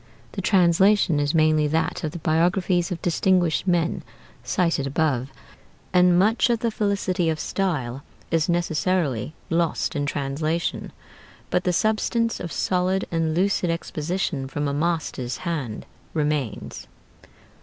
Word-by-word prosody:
The 195 - -4
translation 190 -2 +4
is 145 +2 0
mainly 155 -1 +3
that 160 +2 -1
of 155 - 0
the - - -6
'Biographies 175 +2 +1
of 175 - -3
Distinguished 175 0 +2
Men' 175 -2 +1 0.4
cited 165 -6 0
above, 135 -3 0 0.6
and 180 -1 +5
much 215 +6 +3
of 235 -2 +1
the 230 - 0
felicity 200 -5 0
of 155 -1 -1
style 145 -10 -2 0.3
is 165 -1 +1
necessarily 165 - 0 0.2
lost 165 -1 0
in 145 -1 -1
translation; 155 +4 -2 0.6
but 180 - +1
the 180 - +3
substance 220 +4 0
of 170 - -5
solid 185 +1 0
and 165 -1 0
lucid 185 0 +1
exposition 165 -3 -2
from 145 +2 -2
a 140 - -1
master's 150 -5 -2
hand 140 -11 -3 0.3
remains. 150 -8 -2
170 Hz, 130 wpm, -24 LUFS, 150-185 Hz, 0.6 s, and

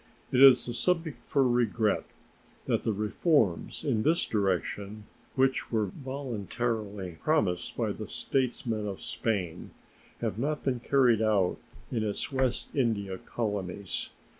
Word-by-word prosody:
It 130 - +3
is 130 -3 +8
a 120 - -2
subject 165 -2 0
for 135 -3 +3
regret 120 -3 +1 0.6
that - - +1
the 115 - 0
reforms 105 - +1
in 110 - +1
this 165 +7 +2
direction 100 +1 -1 0.3
which 130 0 +1
were 110 -2 +2
voluntarily 110 - -4
promised 105 - 0
by - - 0
the - - -6
statesmen 120 -5 -1
of 100 -2 -5
Spain 95 -8 -2 0.5
have - - -2
not 150 +4 -1
been 130 -3 0
carried 125 -3 +3
out 105 -5 +2 0.3
in 115 - 0
its 105 +5 -2
West 130 -2 -1
India 100 -8 0
colonies. 100 -4 -3
115 Hz, 130 wpm, -29 LUFS, 100-130 Hz, 0.6 s, is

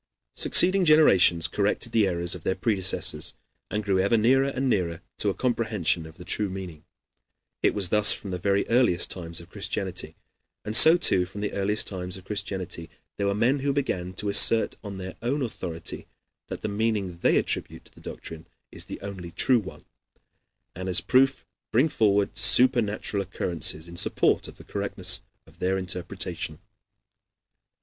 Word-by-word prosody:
Succeeding 185 +1 +4
generations 95 - +4
corrected 105 +3 -1
the 110 -3 +2
errors 85 -1 -1
of 90 - -6
their 95 - -2
predecessors, 95 -5 -2 0.3
and 105 0 -3
grew 95 -2 0
ever 100 +5 +2
nearer 130 +5 +3
and 135 0 -2
nearer 90 -7 -1 0.2
to 105 - +2
a 95 - -3
comprehension 110 -10 -1
of 80 - -16
the 90 - -12
true 105 +3 -1
meaning. 90 -5 -8 0.8
It - - +1
was 100 -4 0
thus 105 +1 +6
from 100 - -2
the 90 - -4
very 100 +2 0
earliest 115 -8 +2
times 85 -2 -4
of 85 +1 -15
Christianity. 95 -5 -4 0.5
And 105 - -1
so, 160 +7 +10
too, 90 - +3
from 100 +2 -9
the 105 - -3
earliest 105 +2 0
times 90 -1 -5
of 95 - -15
Christianity 95 -5 -4 0.3
there 100 - -1
were 100 - 0
men 125 +6 +1
who 140 +1 -1
began 95 -10 -3
to 100 +2 -3
assert 110 +2 +5
on 100 -2 -7
their 95 -1 -7
own 135 +5 -1
authority 90 -8 -6 0.4
that - - -8
the - - -1
meaning 100 -4 -2
they - - +2
attribute - - -3
to - - -16
the - - -18
doctrine 80 -1 -10 0.2
is - - -5
the - - -8
only 95 -3 -8
true 125 +8 +2
one, 95 -3 -11 0.9
and 95 +1 -5
as 90 - +5
proof 135 +1 +1 0.2
bring 130 +8 +2
forward 100 -4 +1
supernatural 115 -3 +3
occurrences 85 -4 -3
in 85 - -11
support - - +1
of - - -13
the - - -13
correctness - - -1 0.2
of - - -22
their 95 +1 0
interpretation. 90 -2 -4
100 Hz, 170 wpm, -25 LUFS, 90-115 Hz, 0.9 s, so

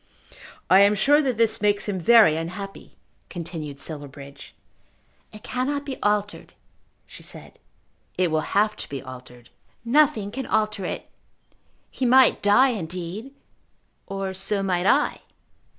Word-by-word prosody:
"I 190 - +6
am 200 +1 +5
sure 290 +8 +4
that 260 -6 -1
this 225 0 +1
makes 205 -1 +1
him 195 -2 -2
very 210 -3 +6
unhappy," 180 +5 -7 0.3
continued 160 -4 -7
Silverbridge. 140 -2 -8 0.8
"It 215 +1 -13
cannot 275 +4 -2
be 270 -2 -7
altered," 205 0 -2 0.5
she - - -13
said. - - -13 0.6
"It 180 -3 +1
will 155 0 +1 0.2
have 210 +1 +2
to - - -6
be 140 -2 -6
altered." 125 -2 -12 0.3
"Nothing 235 -6 +2
can 265 +3 -5
alter 215 -2 -1
it. - - -5 0.8
He 255 - -2
might 260 +1 +5
die, 225 +7 +5
indeed; 185 +3 -5 0.8
or 195 -1 -4
so 195 +1 -2
might 185 -1 0
I." - - +2
200 Hz, 135 wpm, -23 LUFS, 170-230 Hz, 0.8 s, I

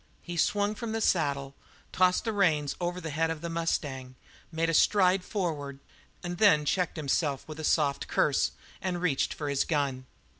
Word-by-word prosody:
He 175 - -6
swung 205 +5 +1
from 220 0 -5
the 225 - -1
saddle, 140 -9 0 0.4
tossed 185 0 +3
the 225 - -2
reins 155 -8 +1
over 175 +1 -2
the 165 -3 -5
head 160 +2 0
of 165 -2 -4
the 170 0 -4
mustang, 140 -6 -2 0.4
made 165 0 0
a 165 - 0
stride 185 +2 +4
forward 155 -9 -3 0.5
and 175 0 -5
then 165 -9 +5
checked 180 +2 0
himself 145 -1 -1
with 155 0 -8
a - - -5
soft 145 -3 +1
curse 145 -2 +1 0.3
and 180 -2 -2
reached 170 -6 0
for 150 - -5
his 140 -1 +1
gun. 135 -5 -1
165 Hz, 180 wpm, -29 LUFS, 145-180 Hz, 0.5 s, then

